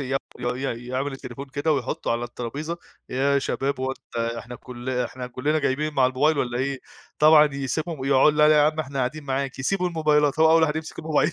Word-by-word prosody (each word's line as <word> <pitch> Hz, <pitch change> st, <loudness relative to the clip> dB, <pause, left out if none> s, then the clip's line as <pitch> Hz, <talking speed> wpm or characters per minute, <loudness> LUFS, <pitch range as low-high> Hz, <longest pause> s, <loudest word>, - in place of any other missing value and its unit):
ي 135 Hz, 0 st, -1 dB, 0.2 s
ي 125 Hz, -1 st, -3 dB
يعمل 135 Hz, +2 st, -2 dB
التليفون 135 Hz, +1 st, -8 dB
كده 145 Hz, +4 st, 0 dB
ويحطّه 140 Hz, -4 st, -2 dB
على 120 Hz, +1 st, -1 dB
الطرابيزة، 140 Hz, +8 st, -5 dB, 0.3 s
"إيه 140 Hz, +2 st, +1 dB
يا -, -, +4 dB
شباب 135 Hz, 0 st, -2 dB
هو 130 Hz, 0 st, -1 dB
أنت 135 Hz, -, -10 dB, 0.2 s
إحنا 125 Hz, +1 st, -8 dB
كل 125 Hz, 0 st, -7 dB
إحنا 125 Hz, 0 st, -3 dB
كلّنا 145 Hz, +5 st, -1 dB
جايبين 150 Hz, +2 st, -1 dB
مع 130 Hz, -2 st, +4 dB
الموبايل 145 Hz, +4 st, +2 dB
والّا 120 Hz, -2 st, -1 dB
إيه" 135 Hz, +1 st, -1 dB, 0.4 s
طبعًا 150 Hz, -2 st, +6 dB
يسيبهم 150 Hz, +3 st, -3 dB
ويقع 135 Hz, +2 st, +4 dB
"لأ 150 Hz, 0 st, +4 dB
يا 150 Hz, -1 st, +6 dB
عم 155 Hz, +1 st, +2 dB
إحنا 140 Hz, -2 st, -5 dB
قاعدين 140 Hz, +4 st, -2 dB
معاك" 135 Hz, 0 st, -2 dB
يسيبوا 180 Hz, +7 st, 0 dB
الموبايلات 150 Hz, -3 st, +2 dB
هو 160 Hz, -, +6 dB
أول 165 Hz, 0 st, +5 dB
واحد 155 Hz, 0 st, +2 dB
يمسك 160 Hz, 0 st, -6 dB
الموبايل. 155 Hz, 0 st, +1 dB
140 Hz, 200 wpm, -24 LUFS, 130-155 Hz, 0.4 s, طبعًا